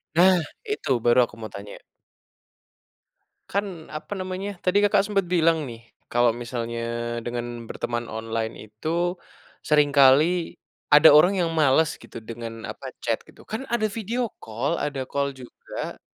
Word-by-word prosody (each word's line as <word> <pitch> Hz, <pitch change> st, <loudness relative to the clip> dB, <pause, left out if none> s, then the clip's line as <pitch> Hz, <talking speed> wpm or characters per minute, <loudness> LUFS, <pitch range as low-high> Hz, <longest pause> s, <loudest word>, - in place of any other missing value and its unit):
Nah, 180 Hz, +2 st, +6 dB, 0.2 s
itu 425 Hz, -, -3 dB
baru 120 Hz, 0 st, +5 dB
aku -, -, -15 dB
mau 110 Hz, -2 st, -8 dB
tanya. 100 Hz, +1 st, -9 dB, 1.8 s
Kan 190 Hz, -6 st, -3 dB
apa 155 Hz, +6 st, -5 dB
namanya, 190 Hz, +1 st, -4 dB
tadi 190 Hz, +3 st, +4 dB
Kakak 205 Hz, -1 st, +4 dB
sempat 200 Hz, -2 st, 0 dB
bilang 165 Hz, -5 st, +2 dB
nih, 115 Hz, -1 st, -11 dB, 0.2 s
kalau 120 Hz, -1 st, +3 dB
misalnya 120 Hz, -1 st, -4 dB, 0.4 s
dengan 120 Hz, -1 st, -5 dB
berteman 120 Hz, 0 st, -3 dB
online 110 Hz, 0 st, -3 dB
itu, 110 Hz, +8 st, -6 dB, 0.7 s
seringkali 150 Hz, +3 st, +4 dB, 0.3 s
ada 150 Hz, +2 st, +9 dB
orang 180 Hz, +6 st, +6 dB
yang 170 Hz, -2 st, 0 dB
males 155 Hz, 0 st, +4 dB
gitu -, -, -11 dB
dengan 115 Hz, -1 st, -6 dB
apa, -, -, -7 dB, 0.2 s
chat -, -, 0 dB
gitu, -, -, -18 dB
kan 220 Hz, +3 st, -4 dB
ada 235 Hz, -2 st, +1 dB
video 225 Hz, +2 st, -2 dB
call, 115 Hz, +9 st, -2 dB
ada 140 Hz, -3 st, -2 dB
call 140 Hz, +1 st, -1 dB
juga. 125 Hz, -2 st, -8 dB
150 Hz, 140 wpm, -25 LUFS, 120-185 Hz, 1.8 s, ada